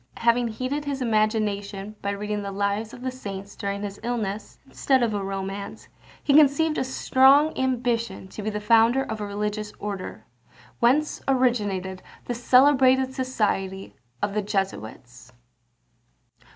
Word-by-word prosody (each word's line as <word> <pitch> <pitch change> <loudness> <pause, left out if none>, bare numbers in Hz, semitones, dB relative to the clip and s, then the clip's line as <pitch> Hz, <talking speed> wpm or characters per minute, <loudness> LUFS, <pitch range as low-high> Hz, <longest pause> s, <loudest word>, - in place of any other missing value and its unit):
Having 235 +1 +2
heated 255 +6 -3
his 280 -1 -3
imagination 215 -3 -1
by 200 - -2
reading 210 +1 -3
the 200 -1 -5
Lives 200 +2 -1
of 245 - -11
the 260 - -2
Saints 200 -5 -8
during 200 0 -4
his 200 -1 -6
illness, 220 -4 -3
instead 265 -1 +1
of 225 -2 0
a 200 -1 -2
romance, 195 +1 -5 0.4
he 280 - +2
conceived 305 +2 +4
a - - +1
strong 265 +3 +4
ambition 235 -6 -1
to 210 - -8
be 210 - -2
the 210 0 -3
founder 230 +4 +4
of 220 -3 -5
a 205 - -3
religious 210 +1 -3
order; 200 -2 -6 0.5
whence 270 +6 +2
originated 205 -8 0 0.2
the 245 - -2
celebrated 260 +1 +4
society 205 -7 -2 0.3
of 205 - 0
the 210 - 0
Jesuits. 130 - -4
215 Hz, 140 wpm, -25 LUFS, 200-255 Hz, 0.5 s, conceived